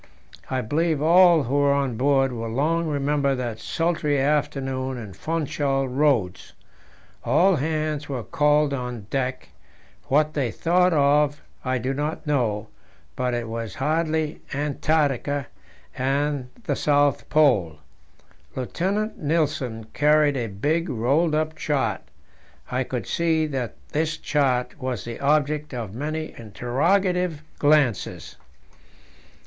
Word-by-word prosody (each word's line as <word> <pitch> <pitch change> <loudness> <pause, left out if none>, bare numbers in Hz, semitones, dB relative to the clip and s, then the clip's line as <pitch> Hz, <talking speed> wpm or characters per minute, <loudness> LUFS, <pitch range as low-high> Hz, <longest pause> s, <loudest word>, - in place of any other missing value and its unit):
I 130 -1 0
believe 155 +6 0
all 170 0 +6
who 125 - -4
were 145 0 +4
on 140 -4 0
board 135 +1 +2
will 115 -2 -4
long 160 +8 0
remember 145 -1 +1
that 120 -3 -4
sultry 160 -4 0
afternoon 135 -2 -1
in 105 -5 -8
Funchal 145 - -1
Roads. 125 -9 0 0.7
All 190 -1 +4
hands 155 0 -2
were 130 -4 -3
called 150 +5 +2
on 125 -5 -4
deck: 130 -1 -2 0.6
what 150 +2 +2
they 135 -6 0
thought 180 +8 +2
of 145 -1 +2 0.2
I 130 0 0
do 130 +3 -2
not 150 +4 -3
know, 120 -8 0 0.5
but 125 -1 -1
it 120 -1 -3
was 115 -2 -5
hardly 155 +2 -1
Antarctica 145 -1 0 0.5
and 140 0 -1
the - - -1
South 145 -2 +2
Pole. 120 - +3 0.8
Lieutenant 195 - -2
Nilsen 145 -7 -1
carried 150 -1 +3
a 120 -3 -2
big 150 - -1
rolled 140 +7 +1
up 155 0 -1
chart; 150 -2 -1 0.7
I 130 +1 0
could 125 -1 -4
see 160 -2 +1
that 130 -7 -3
this 155 +1 -1
chart 130 -2 0
was 130 -3 -3
the 115 -1 -6
object 150 0 +1
of 110 -5 -5
many 155 +5 -4
interrogative 165 - 0 0.2
glances. 145 -8 +1
145 Hz, 120 wpm, -24 LUFS, 125-155 Hz, 0.8 s, all